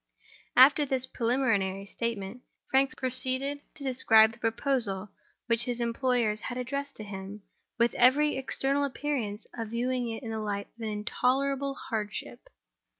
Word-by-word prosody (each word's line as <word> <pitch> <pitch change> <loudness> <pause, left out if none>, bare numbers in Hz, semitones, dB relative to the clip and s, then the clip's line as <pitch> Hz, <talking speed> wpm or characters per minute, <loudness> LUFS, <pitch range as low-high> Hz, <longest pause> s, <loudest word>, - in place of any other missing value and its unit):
After 275 +4 +8
this 265 -2 0
preliminary 230 -7 0
statement, 225 +1 -4 0.3
Frank 270 +2 +3
proceeded 260 +2 +1
to 285 - -10
describe 225 -4 +5
the 225 - -16
proposal 225 -4 -1 0.3
which 230 -1 +2
his 245 -1 -2
employers 235 -2 0
had 245 - -5
addressed 280 +3 -4
to 215 - -7
him, 200 0 -8 0.3
with 235 0 +3
every 285 +5 +4
external 270 +1 0
appearance 260 -7 -3
of 230 -2 -5
viewing 245 +2 -1
it 225 +4 -6
in 225 - -5
the 220 - -3
light 200 -1 -3
of 235 - -15
an 220 - -2
intolerable 270 +6 0
hardship. 215 - -5
245 Hz, 145 wpm, -29 LUFS, 220-265 Hz, 0.3 s, After